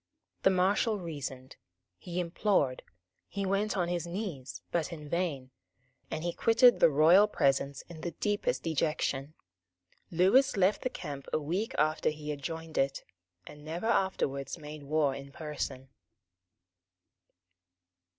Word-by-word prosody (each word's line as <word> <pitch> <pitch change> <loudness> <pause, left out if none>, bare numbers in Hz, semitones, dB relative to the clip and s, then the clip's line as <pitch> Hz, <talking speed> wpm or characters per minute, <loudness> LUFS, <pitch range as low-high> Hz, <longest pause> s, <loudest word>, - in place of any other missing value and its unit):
The - - +5
Marshal 195 +4 +2
reasoned; 140 -6 -6 0.4
he 180 0 -4
implored; 170 -6 +1 0.5
he 200 0 -3
went 200 +2 0
on 175 -2 +1
his 175 -1 -2
knees; 170 - -5
but 170 0 0
in 150 -3 -8
vain; 145 -6 -2 0.6
and 155 - -4
he 175 0 -1
quitted 235 +2 +5
the - - +7
royal 165 +8 +6
presence 140 -5 +1
in 170 -2 -11
the 175 - -2
deepest 205 +5 -1
dejection. 155 -2 -1 0.7
Lewis 195 +10 +4
left 195 +2 +3
the 255 - -1
camp 140 - -7
a - - +2
week 180 +9 -2
after 155 +1 +2
he 150 -1 -5
had 145 -1 -6
joined 160 +2 -4
it, 135 0 0 0.4
and 150 0 -12
never 165 +6 -5
afterwards 190 - 0
made 150 0 -9
war 145 -1 +1
in 140 0 -8
person. 140 -4 -5
160 Hz, 135 wpm, -30 LUFS, 145-190 Hz, 0.7 s, the